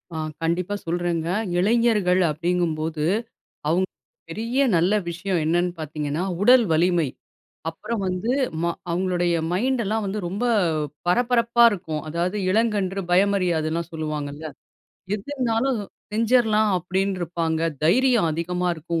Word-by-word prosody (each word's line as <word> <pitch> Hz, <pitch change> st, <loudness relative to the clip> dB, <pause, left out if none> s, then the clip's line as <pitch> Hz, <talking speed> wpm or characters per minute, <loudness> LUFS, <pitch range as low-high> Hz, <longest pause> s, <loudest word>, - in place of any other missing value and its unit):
ஆ -, -, -3 dB, 0.2 s
கண்டிப்பா 175 Hz, +4 st, -1 dB
சொல்றேங்க. 170 Hz, -1 st, -1 dB, 0.3 s
இளைஞர்கள் 210 Hz, -3 st, +3 dB
அப்டிங்கும்போது, 160 Hz, -1 st, -1 dB, 0.6 s
அவங்க 175 Hz, +4 st, +2 dB, 0.4 s
பெரிய 230 Hz, +4 st, -2 dB, 0.2 s
நல்ல 175 Hz, +5 st, +2 dB, 0.2 s
விஷயம் 175 Hz, +1 st, -2 dB
என்னன்னு 175 Hz, +2 st, +1 dB
பார்த்தீங்கன்னா 150 Hz, +1 st, -3 dB, 0.2 s
உடல் 245 Hz, +2 st, +6 dB
வலிமை. 170 Hz, 0 st, +3 dB, 0.6 s
அப்பறம் 200 Hz, +6 st, -4 dB
வந்து 185 Hz, +6 st, -1 dB, 0.3 s
ம -, -, +2 dB, 0.2 s
அவங்களுடைய 175 Hz, 0 st, +1 dB, 0.2 s
மைண்ட்டல்லாம் 220 Hz, +1 st, 0 dB
வந்து 200 Hz, +2 st, -2 dB
ரொம்ப 200 Hz, +7 st, -3 dB, 0.6 s
பரபரப்பா 235 Hz, +3 st, +3 dB
இருக்கும். 160 Hz, -6 st, -4 dB
அதாவது 175 Hz, +5 st, -1 dB
இளங்கன்று 200 Hz, -3 st, +1 dB
பயமரியாதுன்னல்லாம் 175 Hz, -4 st, +1 dB
சொல்வாங்கல்ல. 155 Hz, -1 st, -4 dB, 0.7 s
எது 205 Hz, -1 st, -6 dB
இருந்தாலும் 250 Hz, -1 st, 0 dB, 0.3 s
செஞ்சர்லாம் 220 Hz, -1 st, +3 dB
அப்டின்னுருப்பாங்க. 175 Hz, -3 st, -1 dB, 0.2 s
தைரியம் 235 Hz, +1 st, +4 dB
அதிகமா 180 Hz, +3 st, -1 dB
இருக்கும், 165 Hz, +1 st, -3 dB
180 Hz, 105 wpm, -23 LUFS, 165-215 Hz, 0.7 s, உடல்